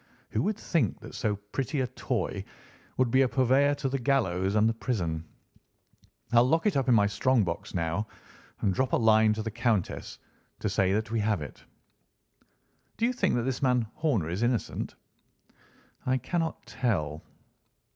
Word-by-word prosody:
Who - - 0
would 215 0 0
think 155 - 0
that - - -10
so 105 -2 -1
pretty 110 +8 -3
a - - +1
toy 125 - -3 0.5
would 130 -2 +2
be 130 - +5
a 135 - +4
purveyor 135 +3 +3
to 140 -1 -2
the 135 +1 -1
gallows 100 -8 +1
and 110 +1 +4
the 115 - +2
prison? 90 -9 -2 1.1
I'll 120 0 +6
lock 165 +7 +2
it 210 - +2
up 135 -1 +1
in 120 - +6
my 105 -2 +5
strong 120 +3 +2
box 85 0 -4
now 85 +5 -1 0.5
and 95 - +2
drop 130 +5 0
a - - +5
line 110 -1 +5
to 110 0 -4
the 110 - -3
Countess 115 -4 -1 0.4
to - - -2
say 95 -1 +2
that 110 +2 -1
we 115 - +1
have 105 -2 +1
it." - - -11 1.3
"Do 230 - +2
you 250 - +1
think 200 -7 +1
that 120 - 0
this 130 0 -2
man 125 -3 +2
Horner 125 - 0
is 90 +5 -2
innocent?" 120 -1 -1 1.1
"I 130 +1 +1
cannot 165 +5 -2
tell." 80 - -1
115 Hz, 175 wpm, -28 LUFS, 105-130 Hz, 1.3 s, I'll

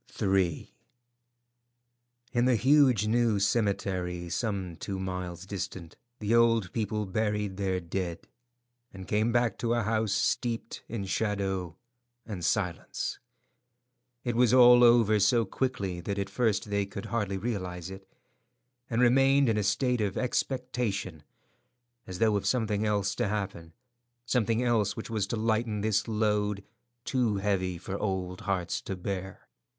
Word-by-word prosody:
III. 95 -4 0 1.6
In 120 0 +2
the 125 -1 +4
huge 130 -2 +4
new 115 -1 +2
cemetery, 95 -4 -1
some 95 -2 -2
two 100 -2 -4
miles 90 -1 -5
distant, 95 -4 -6 0.2
the 105 0 -1
old 115 -5 +3
people 105 -1 -1
buried 105 -1 -1
their 95 -2 0
dead, 85 -1 -4 0.6
and 95 -1 -10
came 110 +2 +1
back 120 -3 +1
to 120 0 +1
a 120 - 0
house 110 0 0
steeped 115 +3 -1
in 110 -4 -4
shadow 95 -4 -2 0.5
and 100 -6 -6
silence. 90 -1 -2 1.0
It 120 -2 -2
was 125 0 +4
all 125 -1 +8
over 115 -3 +5
so 115 +3 +3
quickly 100 -5 -2
that 100 +2 -3
at 100 - -3
first 110 -4 0
they 100 -1 0
could 100 0 -7
hardly 100 -4 -1
realize 95 -5 -4
it, 95 0 -11 0.8
and 115 +1 +2
remained 135 +2 +4
in 110 - +2
a - - +2
state 115 +4 +1
of 100 -2 -1
expectation 125 - -2 0.9
as 95 - -6
though 110 +1 +3
of 100 -1 -3
something 110 -3 +1
else 100 -2 0
to - - -1
happen 95 -5 -4 0.5
—something 120 -1 +1
else 110 -5 +1
which 110 - -6
was 105 -3 -1
to - - -2
lighten 110 -1 0
this 105 0 +1
load, 105 -2 0 0.4
too 120 -5 +1
heavy 95 -3 -1
for 95 +3 -5
old 95 -2 -3
hearts 95 -4 -2
to 95 - -5
bear. 95 0 -5
105 Hz, 140 wpm, -29 LUFS, 95-115 Hz, 1.6 s, all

